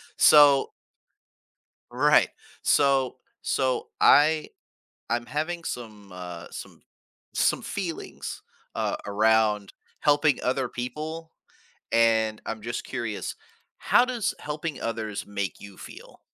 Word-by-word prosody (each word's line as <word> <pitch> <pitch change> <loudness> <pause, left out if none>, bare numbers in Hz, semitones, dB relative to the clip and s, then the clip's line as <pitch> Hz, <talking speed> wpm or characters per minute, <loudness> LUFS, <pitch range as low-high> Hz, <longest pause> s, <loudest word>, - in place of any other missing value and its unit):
So 145 -2 +6 1.2
Right. - - +4 0.3
So 135 -3 +2 0.2
so 130 -1 0
I 155 +1 +5 0.6
I'm 120 0 -1
having 165 +5 -3
some, 110 -7 -7
uh 90 -2 -8
some - - -10 0.5
some - - +2
feelings, 180 -5 -5 0.3
uh, - - -1
around 105 0 +2 0.3
helping 145 0 +3
other 130 0 0
people 155 +7 -6 0.6
and 110 -1 +3
I'm 115 - -4
just 120 +2 -4
curious, 115 -5 -4 0.4
how - - +4
does 245 -4 -1
helping 150 0 -5
others 110 -3 -4
make 100 -2 -4
you 100 -1 -12
feel? - - -12
125 Hz, 105 wpm, -26 LUFS, 110-150 Hz, 1.2 s, So